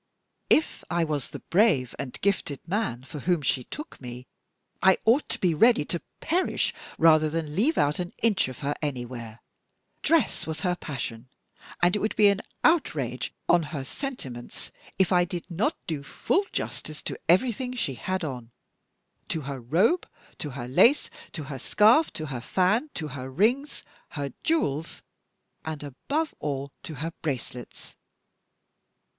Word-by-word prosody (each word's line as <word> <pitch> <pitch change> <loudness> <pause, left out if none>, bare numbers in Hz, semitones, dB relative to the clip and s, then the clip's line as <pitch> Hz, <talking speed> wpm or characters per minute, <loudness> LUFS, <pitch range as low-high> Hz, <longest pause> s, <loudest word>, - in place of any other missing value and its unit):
If 310 - +3
I 170 -1 +2
was 150 -4 -2
the - - -9
brave 175 - +4
and 135 -3 -5
gifted 175 -8 -1
man 170 - -1
for 145 +3 -8
whom 170 +1 +1
she 130 -2 0
took 300 - -8
me, 125 0 -7 0.6
I 190 0 +6
ought 240 +7 +4
to - - -1
be 180 -3 +2
ready 225 -1 +5
to 170 - -3 0.2
perish 350 +3 +1 0.2
rather 155 -1 +6
than 155 -1 -3
leave 265 - +2
out 145 +3 +2
an 175 -1 -3
inch 215 - +2
of 130 -2 -7
her 145 - +1
anywhere. 120 -5 -5 0.6
Dress 320 - +2
was 160 0 -3
her 180 0 +1
passion, 125 -7 -5 0.5
and 175 +2 +5
it - - +1
would 215 - -1
be 210 -1 +7
an 200 +1 +1 0.2
outrage 325 0 +2 0.2
on 175 - +5
her 150 -3 -4
sentiments 135 - -7 0.3
if 190 -1 +3
I 180 -1 +5
did 175 0 -5
not 215 - 0
do 155 -4 -3
full 370 - 0
justice 155 -1 -4
to - - -4
everything 250 +6 +3
she 145 - -1
had 185 +9 -2
on 125 -6 -5 0.8
to 160 - -2
her 140 -1 -5
robe, 185 - +2 0.3
to 150 - -3
her 125 -3 -6
lace, 235 - +4 0.2
to 160 - -4
her 135 -1 -6
scarf, 225 - +5
to 155 - -4
her 130 -5 -4
fan, 190 - +2
to 155 -4 -3
her 130 -2 -6
rings, 240 - +1 0.3
her 140 -3 -4
jewels, 165 - 0 0.6
and, 155 -2 -5
above 280 - -2
all, 140 -1 -3
to 155 - -7
her 160 +4 -4
bracelets. 125 -4 -5
160 Hz, 160 wpm, -27 LUFS, 140-210 Hz, 0.8 s, be